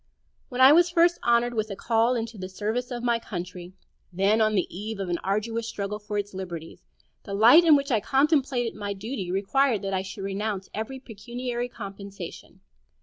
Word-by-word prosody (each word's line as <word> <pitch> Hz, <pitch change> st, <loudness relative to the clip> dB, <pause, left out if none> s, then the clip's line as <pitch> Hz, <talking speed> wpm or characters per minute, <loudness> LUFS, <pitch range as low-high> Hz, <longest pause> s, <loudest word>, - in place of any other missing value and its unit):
When 250 Hz, 0 st, -2 dB
I 260 Hz, +2 st, +9 dB
was 345 Hz, +3 st, +6 dB
first 345 Hz, 0 st, +3 dB
honored 240 Hz, 0 st, +2 dB
with 220 Hz, -1 st, -1 dB
a 200 Hz, -, -4 dB
call 230 Hz, +4 st, +2 dB
into 230 Hz, 0 st, -4 dB
the 185 Hz, -2 st, -6 dB
service 220 Hz, +6 st, -3 dB
of 240 Hz, -2 st, -5 dB
my 235 Hz, -1 st, +2 dB
country, 180 Hz, -3 st, -7 dB, 0.4 s
then 195 Hz, +5 st, +2 dB
on 215 Hz, 0 st, +3 dB
the 185 Hz, -, +2 dB
eve 210 Hz, +2 st, -5 dB
of 190 Hz, -2 st, -3 dB
an 170 Hz, -1 st, -1 dB
arduous 225 Hz, +4 st, -2 dB
struggle 210 Hz, -1 st, -4 dB
for 210 Hz, 0 st, -5 dB
its 205 Hz, 0 st, -3 dB
liberties, 175 Hz, -4 st, -7 dB, 0.4 s
the 200 Hz, -, -6 dB
light 240 Hz, +11 st, +8 dB
in 320 Hz, -3 st, +7 dB
which 280 Hz, 0 st, 0 dB
I 225 Hz, -, +3 dB
contemplated 270 Hz, -2 st, +1 dB
my 205 Hz, -1 st, -4 dB
duty 200 Hz, -2 st, -5 dB
required 215 Hz, +4 st, +1 dB
that 195 Hz, 0 st, -2 dB
I 190 Hz, -, +1 dB
should 195 Hz, +1 st, -7 dB
renounce 195 Hz, 0 st, -3 dB
every 220 Hz, +5 st, -4 dB
pecuniary 245 Hz, +1 st, -5 dB
compensation. 200 Hz, -4 st, -9 dB
220 Hz, 190 wpm, -26 LUFS, 195-245 Hz, 0.4 s, I